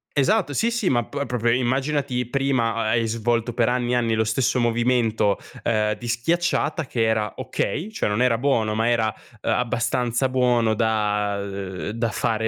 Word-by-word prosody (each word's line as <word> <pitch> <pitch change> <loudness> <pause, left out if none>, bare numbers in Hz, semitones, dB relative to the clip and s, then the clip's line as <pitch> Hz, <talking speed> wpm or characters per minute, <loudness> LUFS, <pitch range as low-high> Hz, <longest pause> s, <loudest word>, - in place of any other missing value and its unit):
Esatto, 175 +2 +2
sì, 230 - +1
sì. 230 -5 0
Ma 120 -2 +2
p 140 0 -4
proprio 120 -1 0
immaginati 130 +1 0
prima 130 -3 +1
ha 115 -1 -1
hai 115 -1 +1
svolto 115 +1 -1
per 115 0 +2
anni 125 0 0
e - - +3
anni 115 -2 +1
lo 110 - +2
stesso 120 +3 +1
movimento, 115 -3 +1 0.3
ehm, 105 -2 +1
di 120 +3 -8
schiacciata 160 +5 0
che 115 -2 0
era 110 -1 0
okay, 170 - -3
cioè 220 - -1
non 105 +4 0
era 120 -2 +3
buono, 115 -5 +1
ma 115 +2 +1
era, 110 -2 +1 0.3
ehm, - - 0
abbastanza 125 +1 0
buono 125 -3 +2
da 105 -2 0
ehm, 100 -2 -5
da 115 0 -1
fare 110 +2 -1
120 Hz, 180 wpm, -23 LUFS, 110-130 Hz, 0.3 s, e